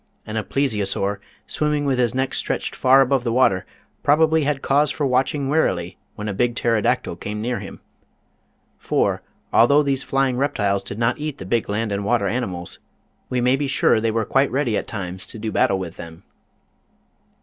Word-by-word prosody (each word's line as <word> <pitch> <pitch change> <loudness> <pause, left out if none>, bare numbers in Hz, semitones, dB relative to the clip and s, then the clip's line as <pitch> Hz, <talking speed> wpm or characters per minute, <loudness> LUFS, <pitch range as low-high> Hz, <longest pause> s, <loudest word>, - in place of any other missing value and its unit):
And 110 - -6
a 110 - +1
Plesio 120 -3 0
saur, 100 +1 -1 0.3
swimming 150 -1 -1
with 135 -2 +1
his 120 -1 +1
neck 130 0 -1
stretched - - -2
far 130 +1 +5
above 135 -1 +2
the 120 - -1
water, 115 -7 +2 0.3
probably 160 +1 +3
had 145 -1 -1
cause 145 +2 +3
for 145 +1 -1
watching 135 +2 +1
warily 115 - 0 0.2
when 105 0 -5
a 105 - -2
big 120 +4 0
Pterodactyl 115 -4 0
came 105 +2 -5
near 120 +2 -2
him. - - -9 1.0
For, - - 0 0.3
although 140 +6 +5
these 135 -2 0
flying 135 -2 0
reptiles 105 -8 0
did 100 +1 -6
not 115 +3 0
eat 150 -1 -4
the 95 - -8
big 115 +4 0
land 105 +1 -1
and 100 0 -2
water 110 0 +1
animals, 95 -7 -3 0.5
we 125 -1 0
may 125 +2 +3
be 140 +1 -2
sure 135 -4 +3
they 115 - +1
were 110 0 0
quite 135 +4 +2
ready 130 -5 0
at - - -2
times 95 -3 -5
to - - -8
do 110 0 -4
battle 95 - +2
with 90 -3 -6
them. 85 +2 -10
120 Hz, 190 wpm, -22 LUFS, 105-135 Hz, 1.0 s, far